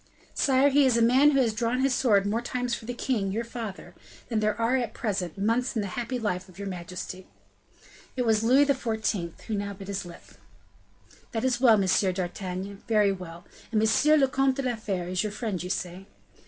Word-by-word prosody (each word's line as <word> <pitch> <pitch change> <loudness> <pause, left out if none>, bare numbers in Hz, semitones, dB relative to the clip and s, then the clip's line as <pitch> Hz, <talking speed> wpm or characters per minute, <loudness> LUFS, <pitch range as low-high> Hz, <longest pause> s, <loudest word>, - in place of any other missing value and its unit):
"Sire, 270 +1 +3
he 285 +1 +4
is 245 -2 +3
a - - +3
man 260 +5 +5
who 275 -2 +2
has 235 -4 +2
drawn 235 +3 0
his 270 -1 +2
sword 215 -6 +3
more 215 +3 0
times 245 0 -3
for 225 - -4
the 245 - -4
king, 225 -7 -1
your 225 +4 -2
father, 230 -4 -7 0.4
than 225 -3 0
there 215 0 0
are, 230 +3 +2
at 240 -4 -2
present, 195 -7 -3
months 230 +6 0
in 220 - 0
the 200 - -4
happy 245 +1 -3
life 185 -5 -3
of 180 - -17
your 200 0 -5
majesty." 185 0 -7 0.9
It 250 - +1
was 220 -2 +3
Louis 260 +5 +5
XIV. 220 - -1
who 225 - -6
now 200 0 -2
bit 195 0 -10
his 200 0 -3
lip. 175 -1 -11 1.1
"That 225 - -2
is 250 -1 0
well, 235 -4 +7
M. 195 - +1
d'Artagnan, 185 +1 -1
very 210 -3 +3
well! 175 -2 -8 0.3
And 220 - +2
M. 295 +8 +4
le 270 - +4
Comte 270 0 +1
de 275 - -3
la 250 -2 0
Fere 195 -5 -3
is 180 0 -1
your 210 - -2
friend, 210 -4 -3
say 180 -2 -3
you?" 195 - -15
220 Hz, 210 wpm, -27 LUFS, 195-245 Hz, 1.1 s, well